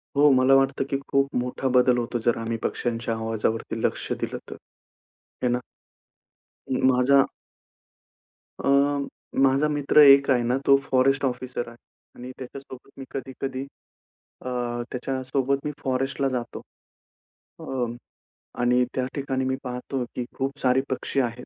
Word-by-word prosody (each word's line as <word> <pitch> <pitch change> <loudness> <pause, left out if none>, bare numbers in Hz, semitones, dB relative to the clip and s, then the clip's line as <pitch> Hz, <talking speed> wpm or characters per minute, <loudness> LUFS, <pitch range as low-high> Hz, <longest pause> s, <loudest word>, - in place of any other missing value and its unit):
हो. 145 +1 +6
मला 130 +1 +5
वाटतं, 135 0 +2
की 135 - 0
खूप 140 0 +1
मोठा 125 +1 -3
बदल 125 0 +4
होतो, 120 0 -2
जर 120 - +3
आम्ही 115 0 -3
पक्ष्यांच्या 115 -1 -2
आवाजावरती 110 0 -2
लक्ष - - -1
दिलं - - -3
तर. - - -7 0.9
है 125 - +3
ना. 120 0 +1 1.1
म 130 - 0
माझा 135 +2 +4 1.4
अ, - - +2 0.7
माझा 135 +2 +4
मित्र 145 0 +3
एक 140 -1 +8
आहे 125 -2 +3
ना 120 +2 +1
तो 140 - +7
फॉरेस्ट 135 +1 +3
ऑफिसर 125 -1 -3
आहे 115 - -15 0.4
आणि 125 +1 -8
त्याच्यासोबत 130 0 -10
मी 135 - -7
कधी-कधी 135 0 -5 0.8
अ, - - -16 0.5
त्याच्यासोबत 135 +2 -1
मी 150 - -1
फॉरेस्टला 135 +1 0
जातो. 120 -2 -4 1.0
अ, 125 -2 -2 0.8
आणि 125 +1 +3
त्या 130 - 0
ठिकाणी 135 -2 -2
मी 130 0 0
पाहतो, 125 +1 -4
की 125 - -2
खूप 135 +2 -3
सारे 130 -1 +3
पक्षी 130 +1 -2
आहेत 120 0 -4
130 Hz, 135 wpm, -25 LUFS, 125-135 Hz, 1.4 s, एक